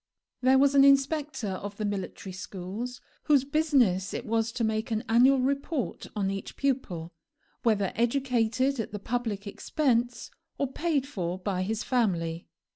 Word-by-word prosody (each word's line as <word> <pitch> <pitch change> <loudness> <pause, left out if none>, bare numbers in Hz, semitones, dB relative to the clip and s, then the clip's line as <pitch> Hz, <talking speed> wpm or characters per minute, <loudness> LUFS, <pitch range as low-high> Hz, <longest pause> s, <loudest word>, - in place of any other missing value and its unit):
There 260 +1 +5
was 280 +1 +4
an 275 -1 +7
inspector 275 -3 +3
of 200 +2 -5
the 215 - -2
military 195 -1 -4
schools, 200 +7 -6 0.2
whose 285 -4 +4
business 275 - +2
it 245 - -4
was 225 0 0
to 245 - -2
make 220 +2 0
an 220 0 -1
annual 250 +4 +5
report 275 +1 -2
on 195 -2 0
each 195 0 -6
pupil, 195 -12 -2 0.5
whether 205 -5 +2
educated 250 +1 +1
at 225 - -3
the - - -2
public 220 -1 -3
expense 240 +3 -1 0.3
or 280 -2 -1
paid 310 -5 0
for 180 -9 -3
by 185 -1 -2
his 215 +3 -2
family. 175 -9 0
230 Hz, 150 wpm, -28 LUFS, 200-270 Hz, 0.5 s, an